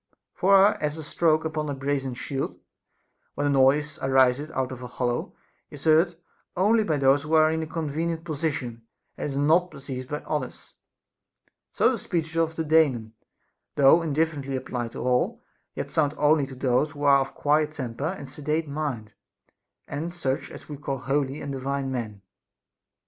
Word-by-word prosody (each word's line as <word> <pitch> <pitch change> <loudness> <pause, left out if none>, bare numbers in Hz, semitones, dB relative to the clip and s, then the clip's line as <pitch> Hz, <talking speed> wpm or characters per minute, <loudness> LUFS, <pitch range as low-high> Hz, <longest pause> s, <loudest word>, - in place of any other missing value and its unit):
For 195 +1 +4
as 150 0 -1
a 160 - -6
stroke 160 +1 +2
upon 155 -1 -2
a 140 - -2
brazen 135 -1 -2
shield, 135 +2 -4 0.8
when 145 - -1
the 145 - +2
noise 140 +3 +3
ariseth 135 +2 +3
out 130 -4 -2
of 130 -1 -7
a 125 - -6
hollow, 120 -1 -2 0.3
is 145 - -11
heard 165 +2 +4 0.4
only 215 +4 +4
by 160 -7 0
those 135 +1 +4
who 155 +2 0
are 155 0 +5
in 160 0 -1
a 160 - -4
convenient 160 +1 -3
position, 150 -7 -3 0.3
and - - -4
is 135 - -4
not 165 +5 +3
perceived 130 -3 -7
by 150 0 -3
others; 145 -5 -4 1.0
so - - +3
the - - -2
speeches 160 -2 -3
of 165 -1 +1
the 160 - -1
Daemon, 145 -8 +2 0.6
though 145 +4 +6
indifferently 150 -3 -1
applied 125 -2 -4
to - - -5
all, 125 0 +1 0.4
yet - - -4
sound 150 -1 +1
only 150 -1 +3
to 135 - -9
those 130 +3 +1
who 145 -1 -7
are 140 -1 +6
of 135 - -1
a - - -22
qniet 150 +1 +2
temper 130 -1 -4
and 140 - -8
sedate 150 +3 -2
mind, 140 -8 -4 0.7
and 165 +5 -4
such 135 -6 -2
as - - -11
we 150 - -7
call 135 -1 -3
holy 140 +1 -1
and 140 - -5
divine 135 0 -2
men. 110 -6 -5
145 Hz, 175 wpm, -26 LUFS, 135-155 Hz, 1.0 s, though